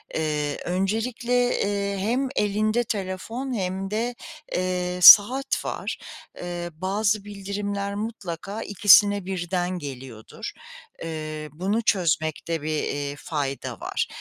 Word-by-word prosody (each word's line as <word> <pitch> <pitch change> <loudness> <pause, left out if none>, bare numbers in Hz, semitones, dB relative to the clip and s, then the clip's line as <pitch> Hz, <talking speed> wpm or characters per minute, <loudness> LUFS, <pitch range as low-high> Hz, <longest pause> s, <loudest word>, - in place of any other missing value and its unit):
Eee, 150 -2 -1
öncelikle, 235 +6 0
eee, 200 0 -1
hem 250 +7 0
elinde 215 +3 +1
telefon 220 +5 -4
hem 190 -2 -3
de, 235 +3 -1 0.4
eee, 180 0 -1
saat 255 +9 +8
var. - - -4 0.4
Eee, 175 -1 -5
bazı 200 +4 0
bildirimler 200 0 -4
mutlaka 205 -1 -5
ikisine 205 -1 +5
birden 180 -1 -2
geliyordur. 130 -6 -8 0.5
Eee, 155 -1 -5
bunu 195 +8 -1
çözmekte 165 -4 0
bir, 155 - -4
iii, 145 0 -3
fayda 145 -2 -4
var. - - -2
195 Hz, 105 wpm, -25 LUFS, 170-210 Hz, 0.5 s, saat